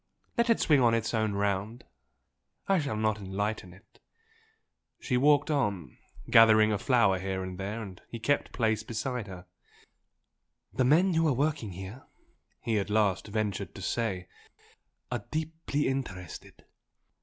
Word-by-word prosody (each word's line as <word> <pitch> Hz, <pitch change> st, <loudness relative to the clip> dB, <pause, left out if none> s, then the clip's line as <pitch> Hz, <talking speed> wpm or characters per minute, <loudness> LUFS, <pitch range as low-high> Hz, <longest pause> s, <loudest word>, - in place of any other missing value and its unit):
Let 235 Hz, 0 st, +1 dB
It 230 Hz, -, +4 dB
swing 145 Hz, -4 st, +4 dB
on 115 Hz, -2 st, +4 dB
its 115 Hz, 0 st, -1 dB
own 110 Hz, -2 st, +1 dB
round 100 Hz, +3 st, -2 dB, 0.8 s
I 195 Hz, -2 st, +3 dB
shall 140 Hz, -8 st, -2 dB
not 110 Hz, -1 st, 0 dB
enlighten 100 Hz, 0 st, -3 dB
it!" 95 Hz, +6 st, -20 dB, 1.0 s
She 125 Hz, -, -1 dB
walked 145 Hz, +3 st, +4 dB
on, 105 Hz, -, -1 dB, 0.3 s
gathering 110 Hz, -1 st, +6 dB
a 105 Hz, -, 0 dB
flower 115 Hz, -8 st, +3 dB
here 95 Hz, 0 st, -3 dB
and 95 Hz, 0 st, -7 dB
there, 105 Hz, +4 st, -4 dB
and 95 Hz, -4 st, -10 dB
he 115 Hz, -, -6 dB
kept 145 Hz, +5 st, 0 dB
pace 110 Hz, -3 st, 0 dB
beside 115 Hz, +1 st, -4 dB
her. 90 Hz, -2 st, -9 dB, 1.3 s
"The 130 Hz, -, +1 dB
men 175 Hz, +8 st, +4 dB
who 165 Hz, 0 st, +3 dB
are 145 Hz, -, +3 dB
working 140 Hz, -6 st, -1 dB
here" 95 Hz, +8 st, -9 dB, 0.5 s
he 110 Hz, -3 st, 0 dB
at 100 Hz, -, -3 dB
last 105 Hz, -3 st, +1 dB
ventured 105 Hz, -2 st, -3 dB
to 95 Hz, -, -8 dB
say 95 Hz, -5 st, -2 dB, 0.8 s
"are 120 Hz, -4 st, -2 dB
deeply 160 Hz, -1 st, -2 dB
interested. 100 Hz, -, -5 dB
110 Hz, 145 wpm, -29 LUFS, 100-130 Hz, 1.3 s, gathering